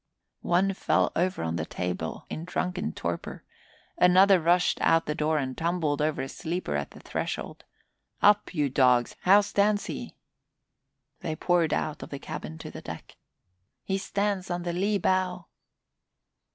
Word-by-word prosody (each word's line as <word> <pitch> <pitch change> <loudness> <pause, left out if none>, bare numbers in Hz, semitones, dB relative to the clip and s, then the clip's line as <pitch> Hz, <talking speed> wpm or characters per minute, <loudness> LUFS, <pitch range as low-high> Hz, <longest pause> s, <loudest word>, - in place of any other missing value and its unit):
One 190 +3 +3
fell - - +1
over 185 - 0
on 80 0 -2
the 80 - -2
table 90 -3 -4
in 160 - -5
drunken 180 +3 -2
torpor. - - -5 0.6
Another 185 +2 +6
rushed 175 +2 +2
out 165 0 +3
the 150 - -1
door 155 +1 0
and 130 -3 -2
tumbled 165 -3 0
over 155 -2 0
a - - -4
sleeper 165 - -3
at 75 0 -2
the - - -14
threshold. - - -5 0.5
"Up, 205 0 +4
you 150 -5 +1
dogs! 125 -2 +3
How 200 +3 +6
stands 205 0 +1
he?" - - -6 1.0
They 155 - -3
poured 170 -1 +2
out 155 -1 -2
of - - -8
the 140 - -5
cabin 80 - -7
to - - -8
the - - -9
deck. - - -9 0.7
"He 195 0 -1
stands 200 -1 -1
on 175 0 -2
the 175 -1 -2
lee 200 +4 +1
bow!" 185 -1 0
175 Hz, 155 wpm, -27 LUFS, 150-185 Hz, 1.0 s, Another